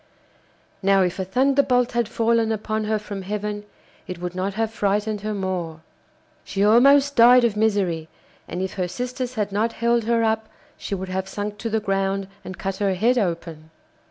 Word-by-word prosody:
Now 195 -1 +4
if 180 +1 -2
a - - 0
thunderbolt 250 +3 +2
had 235 -3 0
fallen 230 -1 +1
upon 215 0 -2
her 215 0 +1
from 205 -2 -6
heaven 210 +1 -4 0.4
it 180 -2 -6
would 180 0 -4
not 190 +2 -3
have 225 0 -1
frightened 210 0 0
her 215 0 -3
more. 180 -5 -3 0.6
She 200 +1 0
almost 275 +6 +5
died 245 +2 +7
of 230 -3 +2
misery, 195 -7 0 0.4
and 180 +2 -4
if 190 - -4
her 185 -2 -2
sisters 250 +5 -4
had 210 -2 -1
not 220 +3 0
held 235 -1 +1
her 230 0 +2
up, 220 0 0 0.3
she 200 - -4
would 190 0 -6
have 190 +1 -3
sunk 205 +1 -5
to 230 - -3
the 220 0 +1
ground 195 -1 -1 0.2
and 185 - -8
cut 195 0 -3
her 195 -2 0
head 240 +6 +2
open. 165 -5 -3
210 Hz, 185 wpm, -23 LUFS, 190-230 Hz, 0.6 s, died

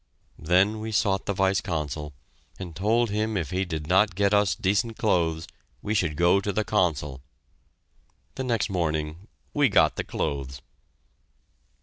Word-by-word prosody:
Then 95 +6 +2
we 110 +1 -5
sought 100 -2 +1
the 100 - 0
Vice 95 0 +1
Consul 75 -4 -4 0.5
and 90 -4 -8
told 110 +5 +1
him 110 0 -1
if 85 -3 -3
he 95 +1 0
did 80 -4 -4
not 95 +3 +3
get 100 +1 +2
us 100 -5 +3
decent 105 +5 0
clothes, 85 -6 0 0.4
we 105 - -1
should 90 -8 0
go 90 +4 +3
to 100 - -2
the 110 +2 0
Consul. 75 -10 0 1.1
The 130 - -4
next 120 -4 0
morning 80 +1 -2 0.3
we 145 -3 +3
got 80 -7 +3
the - - -1
clothes! 65 -2 -4
95 Hz, 150 wpm, -26 LUFS, 80-105 Hz, 1.1 s, not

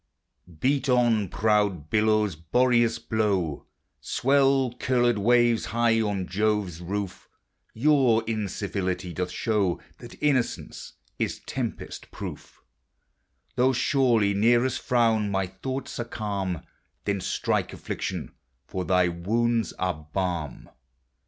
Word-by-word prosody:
Beat 135 0 +1
on, 120 -6 +3
proud 105 -8 +1
billows; 110 -3 +2
Boreas, 120 +7 +2
blow; 100 - -1 0.3
Swell, 135 -1 +2
curled 120 -3 +2
waves, 120 +1 +3
high 115 0 +2
as 100 -4 -1
Jove's 100 -3 -1
roof: 95 +1 -5 0.5
Your 125 -3 +4
incivility 100 -4 -3
doth 90 +2 -2
show 100 -5 0 0.2
That - - -11
innocence 130 -5 -1 0.3
is - - -2
tempest - - -5
proof; - - -9 0.9
Though 130 +1 +4
surly 120 -6 +2
Nereus 120 +5 +3
frown, 115 -4 +2
my 95 -1 0
thoughts 130 +10 -5
dm; 100 -7 -3 0.4
Then 100 -1 -1
strike, - - -1
Affliction, - - -5 0.3
for 95 +3 -4
thy 90 -1 +3
wounds 115 +6 0
are 80 -5 -3
balm. 90 -6 -3
110 Hz, 105 wpm, -26 LUFS, 95-120 Hz, 0.9 s, Your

